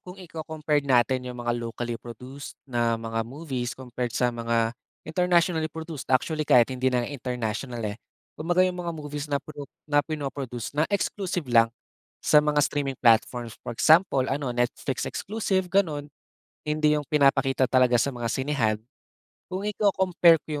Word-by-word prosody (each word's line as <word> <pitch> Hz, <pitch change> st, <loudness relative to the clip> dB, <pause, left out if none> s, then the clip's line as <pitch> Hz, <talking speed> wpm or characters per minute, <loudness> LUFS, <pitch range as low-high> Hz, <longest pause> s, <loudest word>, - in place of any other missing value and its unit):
kung 180 Hz, +1 st, -11 dB
iko-compared 160 Hz, -4 st, -2 dB
natin 125 Hz, 0 st, +2 dB
'yong 125 Hz, -, -7 dB
mga 120 Hz, -, +1 dB
locally 120 Hz, 0 st, -4 dB
produced 125 Hz, +4 st, -9 dB
na 120 Hz, -3 st, 0 dB
mga 115 Hz, 0 st, -3 dB
movies 125 Hz, 0 st, -4 dB
compared 125 Hz, -2 st, -4 dB
sa 125 Hz, -1 st, +2 dB
mga 115 Hz, -1 st, 0 dB, 0.3 s
internationally 175 Hz, -2 st, +2 dB
produced. 160 Hz, -1 st, -7 dB
Actually, 155 Hz, +4 st, +1 dB
kahit 125 Hz, +1 st, +5 dB
hindi 130 Hz, +1 st, +1 dB
na 125 Hz, -1 st, +1 dB
international, 120 Hz, -3 st, -4 dB
eh, 105 Hz, +1 st, -4 dB, 0.3 s
kumbaga 175 Hz, +3 st, +2 dB
'yong 180 Hz, -1 st, -2 dB
mga 170 Hz, -1 st, -3 dB
movies 145 Hz, -1 st, -5 dB
na 140 Hz, -, +1 dB
prod 145 Hz, 0 st, -8 dB, 0.2 s
na 145 Hz, -1 st, +3 dB
pinoproduce 140 Hz, -6 st, -5 dB
na 150 Hz, +2 st, +1 dB
exclusive 195 Hz, -4 st, -1 dB
lang 115 Hz, -1 st, +6 dB, 0.6 s
sa 150 Hz, -, +6 dB
mga 150 Hz, 0 st, +2 dB
streaming 140 Hz, -2 st, -2 dB
platforms. 115 Hz, 0 st, +2 dB
For -, -, -6 dB
example, 155 Hz, -4 st, +5 dB
ano, 140 Hz, 0 st, -1 dB
Netflix 120 Hz, +2 st, -1 dB
exclusive, 195 Hz, -3 st, -2 dB
gano'n. 160 Hz, -7 st, 0 dB, 0.6 s
Hindi 150 Hz, 0 st, +2 dB
'yong 150 Hz, -, -2 dB
pinapakita 135 Hz, -3 st, +3 dB
talaga 125 Hz, -2 st, +4 dB
sa -, -, +1 dB
mga 120 Hz, -2 st, -3 dB
sinehan. 130 Hz, -6 st, 0 dB, 0.7 s
Kung 185 Hz, +2 st, -4 dB
iko-compare 190 Hz, -5 st, +4 dB
ko 150 Hz, -2 st, -4 dB
140 Hz, 150 wpm, -26 LUFS, 120-160 Hz, 0.7 s, lang